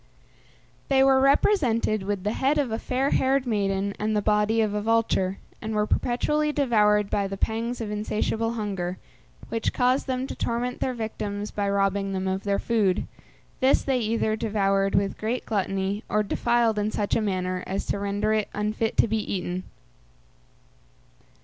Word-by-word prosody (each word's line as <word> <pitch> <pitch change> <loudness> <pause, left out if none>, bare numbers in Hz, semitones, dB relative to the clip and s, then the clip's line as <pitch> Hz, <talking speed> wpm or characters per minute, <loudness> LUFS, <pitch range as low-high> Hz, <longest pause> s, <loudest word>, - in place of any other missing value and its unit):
They 270 -1 +4
were 270 -1 +5
represented 265 - +3
with 195 -1 -3
the 210 - 0
head 275 +5 +1
of 275 -6 0
a 220 - -2
fair 265 +2 0
haired 265 0 +2
maiden 200 -3 0
and 215 +1 0
the - - +2
body 210 +1 +2
of 215 -2 +1
a 210 - -1
vulture, 210 -4 +1 0.2
and 220 0 -3
were 210 0 +2
perpetually 300 +7 0
devoured 210 -7 +3
by 200 -1 +1
the 195 0 -5
pangs 230 +4 -2
of 215 -2 -4
insatiable 215 +2 -1
hunger, 190 -5 -3 0.5
which 230 -1 -1
caused 255 +3 +2
them 260 0 -1
to - - -5
torment 245 +1 -2
their 255 - -1
victims 210 -2 -4
by 200 -1 -1
robbing 195 0 0
them 190 0 -2
of 190 +1 -2
their 200 -1 +1
food; 210 -5 +1 0.5
this 265 +1 +3
they 265 -2 +1
either 220 -1 0
devoured 195 -3 +1
with 195 0 0
great 230 +4 -2
gluttony, 195 -1 -1
or 210 0 +2
defiled 235 +1 +1
in 210 +1 0
such 210 -1 -1
a - - +2
manner 185 -3 -2
as 195 +1 -3
to - - -2
render 205 +2 0
it 215 -1 0
unfit 215 +2 -1
to - - +5
be 220 0 0
eaten. 180 -1 -3
215 Hz, 170 wpm, -25 LUFS, 200-235 Hz, 0.5 s, were